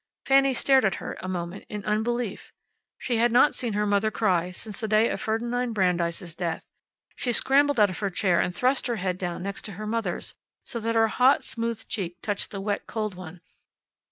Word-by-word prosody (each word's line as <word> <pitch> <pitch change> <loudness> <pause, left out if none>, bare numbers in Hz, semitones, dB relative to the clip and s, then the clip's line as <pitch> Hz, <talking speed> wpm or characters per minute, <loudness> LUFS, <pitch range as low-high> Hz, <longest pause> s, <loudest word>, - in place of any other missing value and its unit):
Fanny 270 -1 +4
stared 265 +2 +4
at 195 -3 +2
her - - -6
a - - -6
moment 180 +1 -4
in 210 -1 -6
unbelief. 220 0 -1 0.5
She 240 -3 -1
had 235 +1 +3
not 250 +5 +5
seen 235 -4 -3
her 210 +1 +1
mother 205 +1 +2
cry 185 -5 +1
since 200 +3 -9
the 220 - -2
day 215 +2 +4
of - - -3
Ferdinand 235 +2 -1
Brandeis' 175 -3 0
death. 165 -1 -3 0.5
She 245 - -1
scrambled 280 +3 +3
out 205 -2 +5
of 180 - -7
her 200 - 0
chair 180 -1 +2
and 180 - 0
thrust 255 +4 +1
her 240 - 0
head 185 -2 -2
down 180 -1 -3
next 200 +2 -4
her 210 +1 -7
mother's, 225 +1 -3 0.3
so 235 - -5
that 230 +1 -1
her 225 0 +5
hot, 255 +5 +4
smooth 230 -2 -4
cheek 180 -6 -4
touched 205 -2 -2
the 200 - -6
wet, 200 +1 -2
cold 215 -3 -3
one. 180 -1 -10
215 Hz, 200 wpm, -26 LUFS, 185-235 Hz, 0.5 s, not